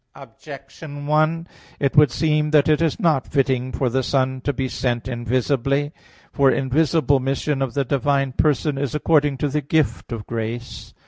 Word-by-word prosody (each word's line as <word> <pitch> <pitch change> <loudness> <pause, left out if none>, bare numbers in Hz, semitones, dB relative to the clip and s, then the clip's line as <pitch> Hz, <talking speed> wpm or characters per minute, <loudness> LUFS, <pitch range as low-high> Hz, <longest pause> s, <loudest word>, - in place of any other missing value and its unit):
Objection 140 +4 -11
1: 155 +3 +1 0.3
It 140 -1 0
would 150 -1 +6
seem 150 +2 0
that 150 -2 +4
it 155 0 +2
is 165 +3 0
not 160 - +1
fitting 130 -2 0
for 130 - -1
the 130 +2 0
Son 130 0 -1
to 145 - -1
be 130 -1 -3
sent 120 -2 -2
invisibly. 130 +3 -1 0.4
For 140 -1 +4
invisible 145 +2 +2
mission 135 +2 -2
of 130 -3 -2
the 140 -1 0
divine 140 +1 0
person 145 +1 0
is 140 -2 -3
according 150 -3 +2
to 145 - -1
the 150 +2 -1
gift 140 -6 -1
of 110 -3 -5
grace. 115 +1 -6
140 Hz, 170 wpm, -21 LUFS, 130-150 Hz, 0.4 s, would